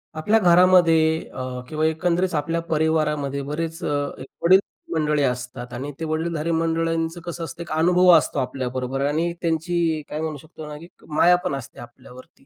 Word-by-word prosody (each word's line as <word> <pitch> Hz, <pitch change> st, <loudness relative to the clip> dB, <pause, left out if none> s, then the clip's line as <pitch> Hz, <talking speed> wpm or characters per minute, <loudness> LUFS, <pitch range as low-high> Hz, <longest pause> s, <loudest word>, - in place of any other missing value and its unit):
आपल्या 205 Hz, +8 st, +2 dB
घरामध्ये 175 Hz, -3 st, +5 dB, 0.3 s
अ, 130 Hz, -, -5 dB, 0.3 s
किंवा 155 Hz, 0 st, -1 dB
एकंदरीत 175 Hz, +3 st, 0 dB
आपल्या 165 Hz, +3 st, -1 dB
परिवारामध्ये 150 Hz, -3 st, 0 dB
बरेच 165 Hz, +2 st, -4 dB
अ, -, -, -1 dB, 0.3 s
एक 130 Hz, -, -9 dB, 0.2 s
वडीलधारी 190 Hz, +3 st, +5 dB, 0.3 s
मंडळी 150 Hz, -2 st, +1 dB
असतात. 125 Hz, -1 st, -3 dB
आणि 135 Hz, +4 st, -5 dB
ते 165 Hz, -, -3 dB
वडीलधारी 160 Hz, +1 st, -2 dB
मंडळींचं 165 Hz, +1 st, -1 dB
कसं 170 Hz, 0 st, -6 dB
असतं 165 Hz, +2 st, -7 dB
एक 170 Hz, -, -8 dB
अनुभव 180 Hz, +3 st, +4 dB
असतो 150 Hz, -, -1 dB
आपल्याबरोबर 130 Hz, 0 st, -3 dB
आणि 160 Hz, +4 st, 0 dB
त्यांची 165 Hz, -1 st, 0 dB
काय 155 Hz, -, -4 dB
म्हणू 155 Hz, -2 st, -3 dB
शकतो 155 Hz, +1 st, -11 dB
ना 150 Hz, 0 st, -7 dB
की 165 Hz, +3 st, -12 dB, 0.2 s
माया 170 Hz, +3 st, +4 dB
पण 140 Hz, -, -1 dB
असते 135 Hz, -1 st, -9 dB
आपल्यावरती. 130 Hz, -, -14 dB
160 Hz, 165 wpm, -23 LUFS, 145-170 Hz, 0.3 s, घरामध्ये